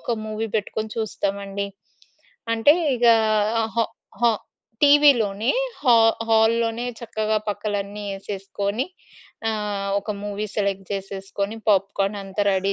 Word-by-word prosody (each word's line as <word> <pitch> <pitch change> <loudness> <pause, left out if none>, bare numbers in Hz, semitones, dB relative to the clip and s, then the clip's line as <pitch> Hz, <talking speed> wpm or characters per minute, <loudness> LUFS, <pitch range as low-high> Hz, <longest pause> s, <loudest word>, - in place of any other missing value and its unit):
ఒక 235 - -2
మూవీ 215 +1 -3
పెట్టుకొని 215 +1 -3
చూస్తామండి. 200 -2 -2 0.9
అంటే 230 +6 +6 0.2
ఇగా 235 -1 +6 0.6
హా 230 - +4 0.4
హా 235 -1 +5 0.5
టీవీలోనే, 260 -7 +5 0.3
హా 245 -4 +6 0.3
హాల్‌లోనే 225 +1 +2 0.2
చక్కగా 215 -1 -1
పక్కలన్నీ 205 0 -3
ఏసేసుకొని 200 +3 -3 0.6
ఆహ్, 205 -2 -2
ఒక 200 +2 -5
మూవీ 205 +1 -3
సెలెక్ట్ 200 -2 -1
చేసేసుకొని, 195 +2 -4
పాప్‌కార్న్ 195 0 +2
అంతా 195 +1 -2
రెడీ 195 0 +1
210 Hz, 105 wpm, -23 LUFS, 200-225 Hz, 0.9 s, అంటే